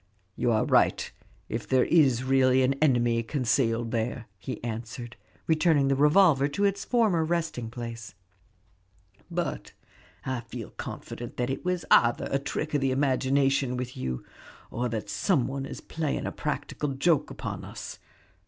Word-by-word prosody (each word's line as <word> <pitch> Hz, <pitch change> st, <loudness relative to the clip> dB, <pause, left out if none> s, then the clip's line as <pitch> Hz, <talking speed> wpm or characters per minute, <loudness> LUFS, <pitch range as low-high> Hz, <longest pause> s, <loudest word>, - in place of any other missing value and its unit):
"You 120 Hz, -, +1 dB
are 110 Hz, -1 st, +2 dB
right, -, -, +2 dB, 0.4 s
if 110 Hz, -2 st, -4 dB
there 130 Hz, +1 st, +4 dB
is 135 Hz, -7 st, +4 dB
really 130 Hz, 0 st, +4 dB
an 130 Hz, +2 st, +3 dB
enemy 120 Hz, -5 st, +3 dB
concealed 115 Hz, -2 st, 0 dB
there," 115 Hz, 0 st, -2 dB
he 95 Hz, -, -6 dB
answered, 120 Hz, +1 st, -5 dB, 0.3 s
returning 155 Hz, -3 st, +3 dB
the 135 Hz, -, +3 dB
revolver 150 Hz, 0 st, +5 dB
to 200 Hz, +8 st, 0 dB
its 200 Hz, 0 st, 0 dB
former 215 Hz, -9 st, +2 dB
resting 160 Hz, -8 st, -2 dB
place; 115 Hz, -2 st, -7 dB, 1.1 s
"but 175 Hz, 0 st, -3 dB, 0.5 s
I 130 Hz, -2 st, -1 dB
feel 115 Hz, -1 st, -8 dB
confident 120 Hz, -1 st, -7 dB
that 125 Hz, +1 st, -1 dB
it 135 Hz, -, -4 dB
was 180 Hz, -1 st, -1 dB
either 120 Hz, 0 st, +4 dB
a 135 Hz, -, +2 dB
trick 150 Hz, +2 st, -4 dB
of 145 Hz, -, +2 dB
the 135 Hz, -, +2 dB
imagination 135 Hz, -1 st, +1 dB
with 125 Hz, 0 st, -5 dB
you, 65 Hz, -1 st, -4 dB, 0.5 s
or 125 Hz, +1 st, -1 dB
that 110 Hz, -2 st, -4 dB
some 130 Hz, -, +1 dB
one 135 Hz, 0 st, -4 dB
is -, -, -8 dB
playing 160 Hz, -3 st, -3 dB
a -, -, -2 dB
practical 145 Hz, -2 st, -3 dB
joke 145 Hz, +2 st, +2 dB
upon -, -, -6 dB
us. -, -, -8 dB
130 Hz, 155 wpm, -27 LUFS, 120-150 Hz, 1.1 s, revolver